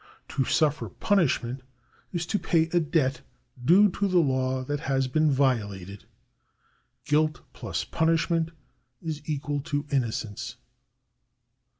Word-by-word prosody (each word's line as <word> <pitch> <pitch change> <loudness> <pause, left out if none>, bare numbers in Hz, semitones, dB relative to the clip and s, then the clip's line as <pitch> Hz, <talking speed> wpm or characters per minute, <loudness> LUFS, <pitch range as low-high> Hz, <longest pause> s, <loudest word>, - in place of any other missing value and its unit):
To 135 - 0
suffer 150 +1 +1
punishment 135 -10 +1 0.5
is 175 -2 -2
to 205 +4 -1
pay 165 -3 +3
a 175 - +3
debt 140 -5 +1 0.4
due 185 +9 +7
to 200 +3 0
the 185 -2 +2
law 130 -4 +1
that 145 +2 -2
has 135 -3 0
been 155 +4 +2
violated. 105 -9 0 1.0
Guilt 155 +1 +2
^^Zws - - -4
punishment 165 0 +2 0.5
is 155 -2 -4
equal 145 -1 -1
to 145 0 -2
innocence. 115 -6 -2
145 Hz, 115 wpm, -27 LUFS, 130-165 Hz, 1.0 s, due